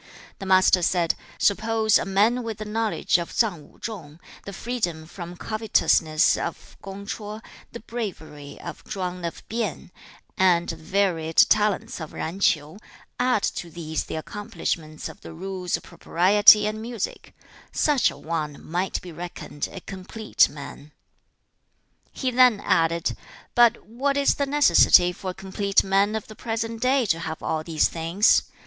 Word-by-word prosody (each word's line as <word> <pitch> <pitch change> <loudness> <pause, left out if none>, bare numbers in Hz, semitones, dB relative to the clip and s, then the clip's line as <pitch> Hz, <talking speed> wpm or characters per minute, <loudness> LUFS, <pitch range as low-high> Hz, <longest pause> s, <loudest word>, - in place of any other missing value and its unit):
The 195 - -6
Master 185 -1 +5
said, 175 -1 +2 0.2
'Suppose 220 +1 +2
a - - -3
man 210 +6 +2
with 225 -3 -5
the 215 - -6
knowledge 215 -3 0
of 170 - -5
Tsang 175 -11 -1
Wu - - -23
chung, 170 -9 -7 0.3
the 200 - -6
freedom 195 -7 -3
from 175 +1 -9
covetousness 185 -8 +2
of 170 - -6
Kung 195 +1 -8
ch'o, 210 0 -6 0.3
the 235 - -9
bravery 160 -11 -7
of - - -8
Chwang 180 -2 -5
of 170 -1 -6
Pien, 220 -6 -4 0.5
and 175 -2 +3
the 165 - -3
varied 165 -1 -1
talents 210 -4 +3
of 155 - -6
Zan 170 +5 -5
Ch'iu; 155 0 +1 0.4
add 245 -4 +2
to 175 - -3
these 160 -1 -4
the - - -6
accomplishments 160 -4 -4
of 205 - -12
the - - -10
rules 185 +1 -3
of - - -15
propriety 205 +4 +5
and 215 +1 -3
music: 230 -2 -5 0.4
such 290 -4 +2
a - - -10
one 155 -3 -4
might 180 +3 -2
be 180 - -9
reckoned 170 -3 -6
a 190 - -8
COMPLETE 195 +4 0
man.' 145 0 -10 1.1
2. - - -35
He 260 -2 +1
then 250 -3 +5
added, 165 0 +1 0.4
'But 240 -2 +4
what 275 +6 -1
is 280 - +3
the 280 - -2
necessity 275 -10 +5
for 190 +1 -6
a - - -4
complete 195 +1 0
man 195 +2 +2
of 220 - -3
the 215 - -12
present 225 0 -4
day 260 0 +2
to 165 -5 +1
have 160 -1 -6
all 155 -1 -1
these 160 -2 +2
things? 170 +5 +3
195 Hz, 160 wpm, -24 LUFS, 165-220 Hz, 1.1 s, Master